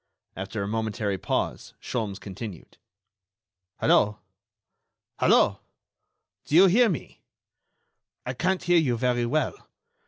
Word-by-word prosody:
After 100 +2 -4
a - - -3
momentary 110 -2 -2
pause, - - -3
Sholmes 105 -5 -4
continued: 100 -2 -9 1.0
"Hello!... 105 0 +3 1.0
Hello!... - - +4 0.9
Do 150 - -1
you 185 +3 +9
hear 225 +6 +5
me?... 165 - -5 1.0
I 125 - -3
can't 185 +7 -1
hear 175 -1 +4
you 125 -7 +1
very 120 0 0
well.... 155 +5 0
120 Hz, 105 wpm, -26 LUFS, 105-160 Hz, 1.0 s, you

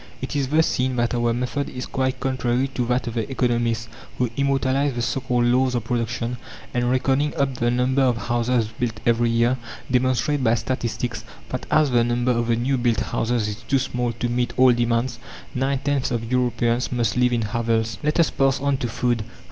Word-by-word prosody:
It - - -5
is 140 -2 +1
thus 155 +4 +3
seen 130 0 0
that 120 0 0
our 120 -1 +1
method 125 +4 -2
is 125 - -5
quite 130 -1 -1
contrary 130 -1 0
to 125 -3 -2
that 125 +1 0
of 120 - -4
the 115 0 -2
economists, 120 -3 0 0.3
who 125 -2 0
immortalize 140 0 +1
the 120 - -2
so 135 - 0
called 120 -1 +1
laws 125 +1 +2
of 120 - -1
production, 115 +1 -2 0.4
and, 120 0 +1
reckoning 135 +3 +1
up 140 -1 0
the 120 -1 0
number 125 +3 +1
of 125 -3 +3
houses 120 -1 0
built 115 -3 -2
every 120 0 +3
year, 115 +2 +2 0.3
demonstrate 130 +2 +1
by 115 -1 +4
statistics, 120 0 -3 0.3
that - - -4
as 155 -3 +3
the 120 -1 +4
number 120 +1 +1
of 120 -1 0
the 115 - +3
new 130 +3 0
built 120 -3 +1
houses 115 -2 -1
is 105 -1 -4
too 135 +4 +1
small 125 -2 -1
to 115 +2 -2
meet 120 0 -1
all 130 0 +7
demands, 120 0 0 0.3
nine 135 +2 0
tenths 140 0 0
of 115 -2 -3
Europeans 125 -1 +1
must 120 -3 0
live 125 0 +3
in 120 -2 +1
hovels. 115 0 -1
Let 150 +2 0
us 165 - +4
pass 135 -1 +2
on 140 0 +1
to 125 - -2
food. 120 -1 0
125 Hz, 205 wpm, -23 LUFS, 120-130 Hz, 0.4 s, all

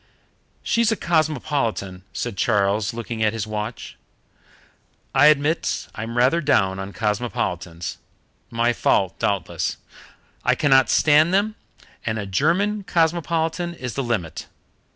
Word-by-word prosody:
"She's 230 -1 +2
a - - +2
cosmopolitan," 145 - -1
said 120 -4 -4
Charles, 100 0 +1
looking 115 -1 -5
at 110 0 +2
his 110 -1 -3
watch. 110 +2 -5 1.2
"I 140 +2 +6
admit 155 +2 +2
I'm 115 +2 -5
rather 130 +8 +3
down 95 - +2
on 95 +1 -5
cosmopolitans. 100 -6 -3 0.5
My 115 +1 +1
fault, 95 -4 +1
doubtless. 100 -2 -1 0.7
I - - +3
cannot 135 -3 +4
stand 155 +4 +4
them, 210 +2 +1 0.5
and 110 -1 -2
a 100 - -3
German 175 - +1
cosmopolitan 170 0 0
is 125 -7 -5
the 135 - -2
limit. 90 - -3
120 Hz, 120 wpm, -22 LUFS, 105-160 Hz, 1.2 s, I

